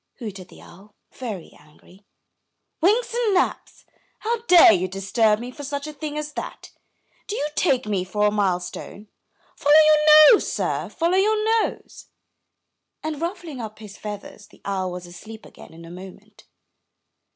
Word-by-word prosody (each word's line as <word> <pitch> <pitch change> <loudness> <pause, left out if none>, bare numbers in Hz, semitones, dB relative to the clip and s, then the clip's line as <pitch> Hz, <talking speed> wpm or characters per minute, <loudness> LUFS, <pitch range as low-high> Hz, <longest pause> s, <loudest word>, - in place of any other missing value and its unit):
hooted 200 -7 -8
the - - -17
owl, 200 +4 -17 0.2
very 215 -9 -7
angry. 150 +6 -21 0.8
"Winks 435 +8 +2
and 465 -4 +1
naps! 365 - -2 0.4
how 460 +1 -2
dare 345 -10 +8
you 185 -1 0
disturb 200 +3 +1
me 245 +2 -7
for 290 - -10
such 285 +1 -4
a 305 - -7
thing 300 0 -6
as 300 0 -5
that? - - -8 0.6
Do 420 - -4
you 295 - -2
take 265 -10 +1
me 200 -3 -1
for 210 +3 -1
a 210 - +3
mile 195 -4 +1
stone? 195 +3 -9 0.5
Follow 290 +1 +3
your 305 +1 +7
nose, 425 - +1
sir, - - -2
follow 340 +3 0
your 425 +2 +2 0.2
nose!" - - -13 0.5
— - - -57
and, 310 -1 -4
ruffling 340 - -5
up 215 -1 -8
his 210 -2 -12
feathers, 205 0 -9
the - - -22
owl 190 -2 -2
was 180 0 -7
asleep 215 +6 -12
again - - -15
in 165 +1 -13
a 165 - -11
moment. 185 +1 -13
225 Hz, 165 wpm, -23 LUFS, 195-310 Hz, 0.8 s, dare